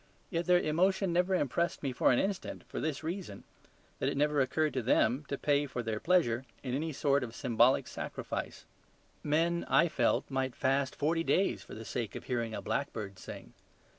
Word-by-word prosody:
Yet 170 -1 -1
their 180 0 +6
emotion 180 +3 +1
never 180 +2 +2
impressed 170 +2 0
me 135 - 0
for 125 - +3
an 125 - +3
instant, 195 +3 -2
for - - -5
this 155 -1 -2
reason, 165 - -5 0.6
that - - +1
it - - -3
never 150 0 +3
occurred 150 +4 +1
to 130 - 0
them 125 +4 +2
to 140 - -3
pay 145 0 +1
for 125 -2 -4
their 110 -1 -2
pleasure 130 -9 +2 0.2
in 125 -2 -3
any 155 +4 -1
sort 140 -1 +1
of 120 -1 -7
symbolic 125 -1 +3
sacrifice. - - -5 0.6
Men 165 +3 +1
(I 170 - +5
felt) 125 -4 +1
might 130 -1 -2
fast 135 0 +1
forty 165 +3 +1
days 190 +3 +1
for - - -10
the 110 - -8
sake 115 -3 -4
of - - -6
hearing 115 -3 -2
a - - -5
blackbird 105 -8 -3
sing. - - -9
140 Hz, 190 wpm, -32 LUFS, 125-165 Hz, 0.6 s, their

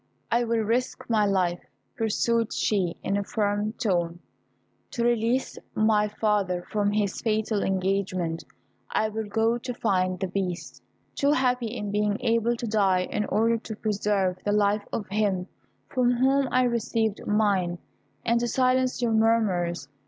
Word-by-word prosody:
I 235 +1 +2
will 230 -1 +1
risk 240 +4 -1
my 210 -2 +3
life," 180 -3 0 0.3
pursued 230 +1 +1
she, 185 -5 0
in 200 - 0
a 200 - -1
firm 205 +1 -1
tone, 175 -7 -1 0.7
"to 235 - -2
release 240 +2 +1 0.2
my 215 -1 +3
father 205 -4 0
from 205 -1 +1
his 205 -2 -1
fatal 220 -2 0
engagement. 185 -3 -1 0.5
I 215 - +1
will 220 0 -4
go 225 +3 +1
to 245 +1 -5
find 185 -5 0
the 190 - -1
Beast; 185 -1 -4 0.3
too 285 +1 +2
happy 250 -3 +1
in 210 -3 -4
being 210 0 +1
able 230 0 +2
to 235 - -5
die 195 -4 +2
in 210 - 0
order 230 +2 +2
to 220 -1 -7
preserve 205 -4 0
the 205 - 0
life 205 0 +2
of 210 - -3
him 195 -3 0 0.4
from 245 -2 +2
whom 265 +2 +2
I 255 0 +3
received 230 -3 -1
mine, 200 -5 +1 0.5
and 235 0 +3
to 240 - -1
silence 255 +1 +1
your 235 - +2
murmurs. 195 -8 +1
215 Hz, 150 wpm, -26 LUFS, 195-230 Hz, 0.7 s, my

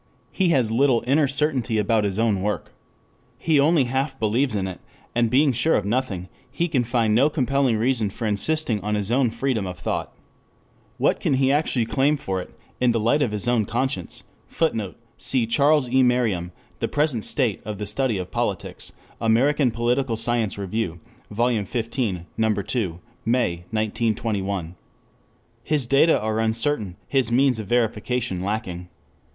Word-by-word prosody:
He 190 -3 +1
has 130 -8 +2
little 125 0 +3
inner 140 +3 +3
certainty 135 -5 0
about 105 0 +2
his 100 -1 -1
own 110 -4 +1
work. 105 +1 -3 0.7
He 155 -3 +2
only 150 +1 +4
half 135 +2 -2
believes 110 +3 +1
in 95 -2 -1
it, 95 - -7 0.3
and 120 -1 +2
being 140 +4 +4
sure 125 +7 +2
of 105 - 0
nothing, 100 -5 -2 0.2
he 155 +7 -1
can 135 -7 +1
find 115 -2 +1
no 130 +7 +4
compelling 135 -4 +1
reason 115 -2 +1
for 110 - -6
insisting 110 +2 +1
on 105 +2 -1
his 105 +1 -1
own 125 0 +3
freedom 115 -4 -1
of 90 -1 -6
thought. 90 - -3 0.9
What - - +2
can - - +1
he 135 0 +2
actually 140 -5 +2
claim 140 +5 +1
for 95 -8 -3
it, - - -10 0.3
in 125 -2 +3
the 115 - +1
light 120 +7 +2
of 135 - +2
his 105 +2 -4
own 120 -3 +2
conscience? 120 - -3 0.2
[Footnote: 110 - -1 0.2
Cf. 125 -4 +1
Charles 145 0 +4
E. 130 +2 +3
Merriam, 115 -9 +1 0.3
The - - 0
Present 145 -7 0
State 125 -9 0
of 105 -1 -5
the 105 - -4
Study 110 +2 0
of 90 -1 -5
Politics, - - -3 0.3
American 130 +5 +3
Political 120 +1 0
Science 115 -2 0
Review, 100 -3 -3 0.3
Vol. 115 0 +1
XV. 115 -3 -2 0.2
No. 110 -1 +2
2, 100 -4 -2 0.2
May, 110 -8 0
1921.] 105 -4 -1 0.9
His 150 -5 0
data 140 +6 +4
are 110 0 -1
uncertain, 110 -3 0
his 130 -4 +1
means 130 -1 +3
of 105 - -6
verification 120 -3 0
lacking. 90 -3 -4
115 Hz, 165 wpm, -23 LUFS, 105-135 Hz, 0.9 s, only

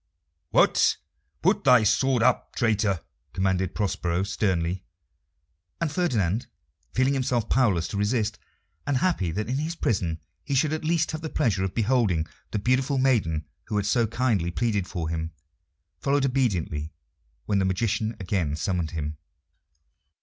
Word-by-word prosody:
"What? - - +4 0.5
Put - - +3
thy 125 -4 +6
sword 120 +3 +3
up, 125 0 +1
traitor!" 105 -6 +1 0.3
commanded 95 0 0
Prospero 95 -3 0
sternly. 95 -3 -1 1.0
And 165 -3 0
Ferdinand, 115 - 0 0.4
feeling 130 +2 +2
himself 125 -4 0
powerless 100 -10 +3
to - - -4
resist, 105 +1 0 0.5
and 140 -2 +2
happy 165 - +1
that 105 +6 -3
in 130 +2 -1
his 160 +3 -2
prison 85 - -1 0.2
he 140 - -2
should 150 +3 +2
at 155 - -3
least 160 0 +1
have 155 - -5
the 160 - -4
pleasure 110 -12 +1
of 95 - -3
beholding 110 -8 +2 0.2
the - - -2
beautiful 130 +6 +1
maiden 105 - +2 0.2
who - - -4
had 100 - 0
so 115 +2 +2
kindly 110 -7 0
pleaded 100 -1 0
for 85 -3 -3
him, 80 0 -3 0.7
followed 140 0 +1
obediently 90 - 0 0.5
when 100 -2 +1
the 95 - +2
magician 110 +3 0
again 90 -6 -1
summoned 85 0 -1
him. 75 -2 -4
105 Hz, 145 wpm, -26 LUFS, 90-130 Hz, 1.0 s, thy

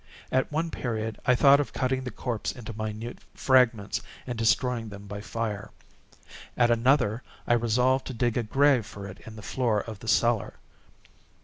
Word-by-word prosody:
At 130 +2 +1
one 160 +2 -1
period 110 -3 -3
I 125 - +6
thought 140 +2 +6
of 145 - -2
cutting 130 0 0
the - - -2
corpse 120 -3 -3
into 115 -2 -8
minute 110 +2 -5 0.2
fragments, 125 -6 +3 0.2
and 125 - -4
destroying 115 0 +1
them 100 0 -10
by 100 0 -6
fire. 110 -1 -4 0.9
At 120 -1 +4
another, 120 -1 +3 0.2
I - - +3
resolved 125 +3 +2
to 130 - -5
dig 120 0 0
a 120 - +2
grave 130 0 +3
for 100 -1 -9
it 95 -1 -9
in 110 - -9
the 105 - -10
floor 115 -5 0
of 110 -2 -8
the 115 - -10
cellar. 115 -1 +2
115 Hz, 175 wpm, -27 LUFS, 110-130 Hz, 0.9 s, I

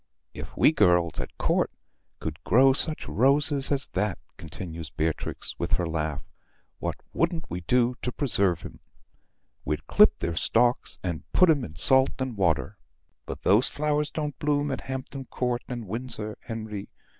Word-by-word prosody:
"If - - -9
we - - +6
girls 90 - +3
at - - -6
Court - - +1 0.5
could 80 +1 -6
grow 135 +3 +5
such 155 +3 -1
roses 140 +3 +3
as 140 -1 0
that," 100 0 -1 0.2
continues 80 -1 -7
Beatrix, 80 0 -3
with - - -3
her 90 - +2
laugh, 80 -2 -3 0.6
"what - - -2 0.2
wouldn't 165 0 -1
we 90 - -3
do 120 +6 +2
to 125 - -2
preserve 100 - +3
'em? - - -10 0.8
We'd 75 +2 -3
clip - - +5
their 85 - -3
stalks 120 +8 +1
and 85 -4 -5
put 180 -3 +6
'em 145 -5 +1
in 80 -8 -8
salt 130 +11 +3
and 130 -3 -3
water. 95 +1 0 0.5
But - - -7
those 105 +6 +4
flowers 150 0 0
don't 150 -3 -4
bloom 145 -1 0
at 135 - -3
Hampton 130 +1 -6
Court 125 -1 -2
and 120 -3 -5
Windsor, 110 -1 -4
Henry." 110 -3 -6
120 Hz, 155 wpm, -26 LUFS, 85-135 Hz, 0.8 s, we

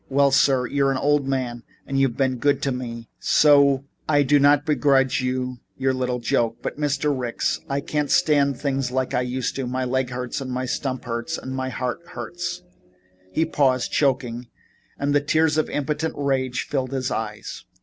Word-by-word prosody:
"Well, 140 0 +3
sir, 135 -2 +3
you're 140 +1 +1
an 135 - 0
old 145 0 +2
man 125 -3 -2 0.2
and 135 0 -1
you've 135 -3 +1
been 130 -2 +1
good 145 +4 +2
to 140 - +1
me, 115 -2 -5
so 140 -2 +4 0.2
I 145 -1 +4
do 145 +2 +4
not 145 +1 +4
begrudge 140 -4 +2
you 125 0 -2 0.2
your 135 0 +1
little 125 -1 -1
joke, 115 -1 0
but - - -4
Mr. 145 0 0
Ricks, 125 -3 -1
I 140 0 0
can't 150 0 -2
stand 140 -3 +3
things 135 -2 -1
like 130 0 -1
I 125 - +2
used 125 0 -2
to. 135 -2 -2
My 130 +1 -2
leg 130 0 0
hurts 125 +1 -4
and 130 - -5
my 130 0 -2
stump 130 0 -3
hurts 115 -1 -3
and 130 0 -6
my 130 0 -2
heart 125 +1 -3
hurts 175 0 -5 0.3
" 95 0 -34
He 160 - +1
paused, 130 -5 +1
choking, 125 -4 0 0.5
and 145 0 0
the 145 - +4
tears 155 +1 +2
of 155 - 0
impotent 150 +2 -2
rage 135 -3 0
filled 135 -2 -2
his 130 -2 -2
eyes. 110 -1 -5
130 Hz, 190 wpm, -23 LUFS, 125-140 Hz, 0.5 s, so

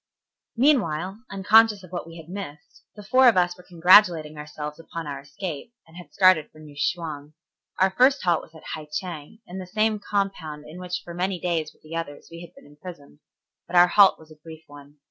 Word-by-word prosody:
Meanwhile, 200 - +1
unconscious 210 +1 +4
of 180 - -14
what 175 -2 -5
we 165 0 -11
had 160 -1 -12
missed, 175 -6 -9
the 210 - -11
four 255 +5 +4
of 230 - +5
us 175 0 +2
were - - -15
congratulating 175 -3 +4
ourselves 150 0 -8
upon 165 0 -8
our 145 -1 -6
escape, 155 +7 -8
and 160 - -20
had 175 0 -12
started 185 -5 +4
for - - -21
New 150 -2 -14
Chwang. 150 -2 -4 0.4
Our 190 0 +3
first 260 +7 +3
halt 175 -3 +2
was 165 - -17
at 160 - -14
Hai 155 -1 -7
Cheng, 175 +5 -6
in 185 +2 -8
the 185 - -8
same 215 +2 0
compound 185 -8 -3
in 165 +4 -11
which 180 0 -5
for 170 - -9
many 180 +1 -2
days 165 -3 -2
with - - -31
the 155 +1 -9
others 155 -3 -6
we 170 0 -10
had 175 -1 -12
been - - -17
imprisoned. 145 - -13 0.5
But - - -7
our 175 0 +7
halt 200 0 +6
was 160 0 -18
a - - -13
brief 160 0 -12
one. 145 0 -15
170 Hz, 210 wpm, -24 LUFS, 155-190 Hz, 0.5 s, our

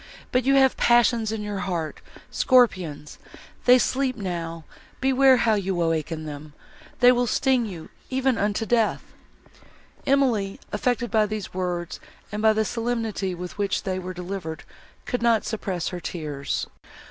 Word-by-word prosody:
—But 250 -1 +1
you 275 +1 +4
have 265 -1 +5
passions 235 -2 +3
in 220 -1 -3
your 205 -1 -4
heart,—scorpions; 180 - 0 0.5
they 250 +1 +8
sleep 260 +1 0
now—beware 200 - 0
how 230 -2 +3
you 195 -3 -1
awaken 165 -1 -1
them!—they 150 - -1
will 245 0 +1
sting 255 0 +2
you, 170 -5 -8 0.2
even 265 -1 +1
unto 210 +1 -1
death!" 225 -1 +1 1.0
Emily, 245 -8 +2
affected 240 -1 -1
by 215 -2 +3
these 210 -2 -5
words 180 -2 -3 0.3
and 210 +1 -3
by 220 0 +5
the 220 0 +1
solemnity, 225 -5 -2
with 180 +3 -8
which 200 -1 0
they 185 -1 -2
were 185 0 -6
delivered, 180 -3 -5 0.4
could 245 - -2
not 230 -2 +3
suppress 190 -5 -3
her 180 - -5
tears. 150 -5 -4
210 Hz, 135 wpm, -24 LUFS, 175-240 Hz, 1.0 s, they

